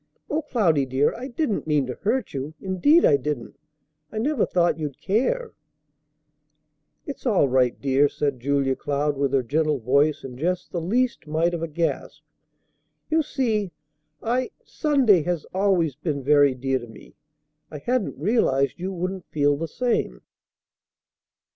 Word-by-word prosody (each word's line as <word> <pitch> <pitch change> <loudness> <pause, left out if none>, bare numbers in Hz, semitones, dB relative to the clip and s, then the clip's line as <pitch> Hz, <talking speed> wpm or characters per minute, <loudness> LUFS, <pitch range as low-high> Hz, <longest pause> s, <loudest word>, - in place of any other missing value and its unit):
"O 305 +2 +1
Cloudy, 175 - +1
dear, 130 +3 +1
I 250 +3 -6
didn't 245 - -2
mean 150 -3 +2
to 125 - -4
hurt 235 - -2
you; 140 +3 -5
indeed 195 - +3
I 145 - +5
didn't! 140 -1 -5 0.5
I - - -7
never 265 +2 +1
thought 175 -2 +1
you'd 150 -4 -5
care." 440 - 0 1.5
"It's 275 -2 -6
all 195 - +3
right, 125 -1 +2
dear," 140 +1 +3
said 140 -3 -2
Julia 135 +1 +1
Cloud 145 +1 -1
with 140 -1 0
her 135 -2 +2
gentle 150 +4 +1
voice, 140 +5 +2
and 125 -1 -8
just 180 +3 -2
the 170 - -2
least 240 +4 0
mite 165 +3 +1
of 170 - -3
a 165 - -2
gasp. 165 +2 -3 0.9
"You 320 +1 +4
see 220 - -1 0.5
I 250 +3 0 0.2
Sunday 270 - +3
has 175 -1 -2
been - - -20
always 180 -7 +2
very 145 -3 +3
dear 130 +1 -1
to 120 - -10
me; 115 - -15 0.6
I 150 - -7
hadn't 240 - -1
realized 150 - +1
you 185 +2 -3
wouldn't 185 0 -4
feel 145 -1 +2
the 165 +3 -4
same." 225 - -1
160 Hz, 155 wpm, -24 LUFS, 140-215 Hz, 1.5 s, I